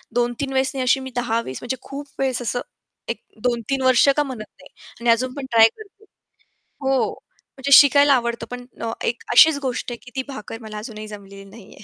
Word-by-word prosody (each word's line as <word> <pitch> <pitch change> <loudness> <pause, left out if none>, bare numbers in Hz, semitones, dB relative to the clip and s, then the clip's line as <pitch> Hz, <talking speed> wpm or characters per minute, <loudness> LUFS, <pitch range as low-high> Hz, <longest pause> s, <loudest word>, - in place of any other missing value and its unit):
2-3 245 +3 -1
वेळेस 265 0 +1
नाही 265 -1 -2
अशी 265 +2 +3
मी - - -9
10 230 -2 0
वेळेस 130 - -7
म्हणजे 255 +1 -3
खूप 285 +1 -8
वेळेस 260 -2 0
असं 245 +1 -2 0.5
एक - - -3 0.2
2-3 245 +2 -1
वर्ष 255 +1 +5
का 295 - +3
म्हणत 250 -6 -7 0.2
नाही - - -15 0.3
आणि 235 0 0
अजून 255 +2 +2
पण 280 -2 -6
ट्राय 225 -1 +7
करते. 430 0 -15 0.8
हो, 265 -1 +1 0.5
म्हणजे 280 +1 -3
शिकायला 285 0 +6
आवडतं, 235 -2 -1
पण 245 0 -7 0.2
अ, 230 -1 -2
एक 235 - -2
अशीच 310 +3 +7
गोष्ट 250 -2 -3
आहे, 240 - -5
की 250 - -14
ती 265 - -1
भाकर 225 -3 -8
मला 215 -1 -8
अजूनही 215 -1 -7
जमलेली 200 -1 -11
नाही 200 0 -14
आहे. 210 - -15
245 Hz, 205 wpm, -22 LUFS, 230-270 Hz, 0.8 s, ट्राय